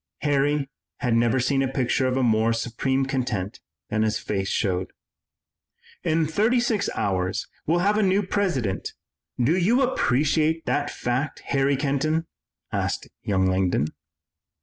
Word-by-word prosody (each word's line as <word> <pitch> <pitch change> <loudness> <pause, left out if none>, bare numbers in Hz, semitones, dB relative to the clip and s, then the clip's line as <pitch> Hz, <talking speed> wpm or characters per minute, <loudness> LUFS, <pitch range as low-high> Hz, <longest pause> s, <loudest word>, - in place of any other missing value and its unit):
Harry 145 0 +1 0.3
had 125 -4 +1
never 120 +2 +3
seen 135 +2 +1
a 135 - +1
picture 130 0 0
of 130 - 0
more 115 -3 +3
supreme 130 +4 -1
content 120 -8 -2 0.3
than 110 - +1
his 110 0 +1
face 95 -2 -2
showed. 95 -2 -1 1.1
"In 160 0 +2
thirty 215 +10 +2
six 235 -3 0
hours 95 -2 -1 0.2
we'll 170 +3 +2
have 210 +1 +3
a - - +3
new 195 +1 +3
President, 175 - -1 0.5
do 130 +8 +3
you 225 +9 +3
appreciate 155 - +1
that 145 0 0
fact, 130 +4 -2
Harry 140 0 +2
Kenton?" 150 +4 0 0.5
asked - - -2
young 95 -2 +1
Langdon. 95 -5 +1
135 Hz, 135 wpm, -24 LUFS, 115-160 Hz, 1.1 s, never